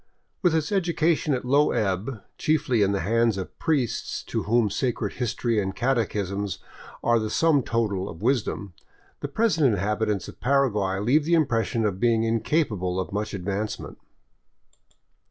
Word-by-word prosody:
With 175 -4 +3
its 155 +1 0
education 170 -5 +1
at 125 - -4
a - - -8
low 145 +3 +4
ebb, 105 +3 -1 0.2
chiefly 130 -7 +1
in 100 -1 +3
the 100 - 0
hands 115 -1 +2
of 95 - -7
priests 145 -8 -1
to - - -3
whom 115 -3 +3
sacred 115 -3 -1
history 115 -2 0
and 95 -1 -3
catechisms 105 -6 -1 0.5
are 120 0 +3
the 110 -1 -2
sum 160 0 +3
total 105 -5 -1
of 80 +4 -10
wisdom, 115 -6 0 0.5
the - - -3
present 160 - +2
inhabitants 105 +1 -1
of - - -11
Paraguay 110 -7 +1
leave 125 +10 +2
the 170 +1 +3
impression 115 -6 +1
of 95 -3 -1
being 115 -1 +3
in 115 0 +1
capable 105 - 0
of 95 - -4
much 105 0 -2
advancement. 100 +3 -4
115 Hz, 155 wpm, -25 LUFS, 100-140 Hz, 0.5 s, low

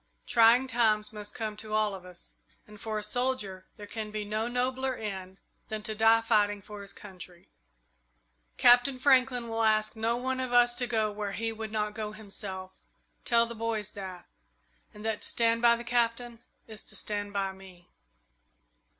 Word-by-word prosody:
Trying 235 +2 +5
times 220 -4 +1
must 210 -1 -7
come 215 -1 -3
to 215 0 -7
all 215 -1 +2
of 185 -2 -9
us, 175 - -11 0.3
and 210 -1 -14
for 220 -1 -3
a 210 - -3
soldier 210 -5 -2
there 205 - -8
can 215 +1 -5
be 210 0 -4
no 215 +2 -1
nobler 255 +2 -1
end 190 -4 -6 0.3
than 215 -1 -4
to 215 - -3
die 225 +1 +5
fighting 210 -2 +2
for 205 +1 -10
his 200 0 -9
country. 180 -3 -12 1.1
Captain 245 +2 +6
Franklin 255 -2 +3
will 225 0 -2
ask 215 0 +2
no 225 +2 0
one 260 +1 -2
of 255 -1 -3
us 240 0 +5
to 245 -1 -1
go 220 -3 +1
where 205 -1 -4
he 225 0 -2
would 220 -1 -6
not 210 -1 -1
go 215 -1 -5
himself. 195 -3 -6 0.5
Tell 235 -1 +4
the 235 - -7
boys 220 -2 -2
that, 190 -3 -8 0.7
and 210 +1 -11
that 220 -1 -1
to - - 0
stand 230 0 +2
by 235 -1 +6
the 235 - -7
Captain 235 0 0 0.3
is 220 -1 -9
to - - -9
stand 205 -1 -2
by 195 -1 -1
me." 190 -2 -15
215 Hz, 180 wpm, -29 LUFS, 205-235 Hz, 1.1 s, Captain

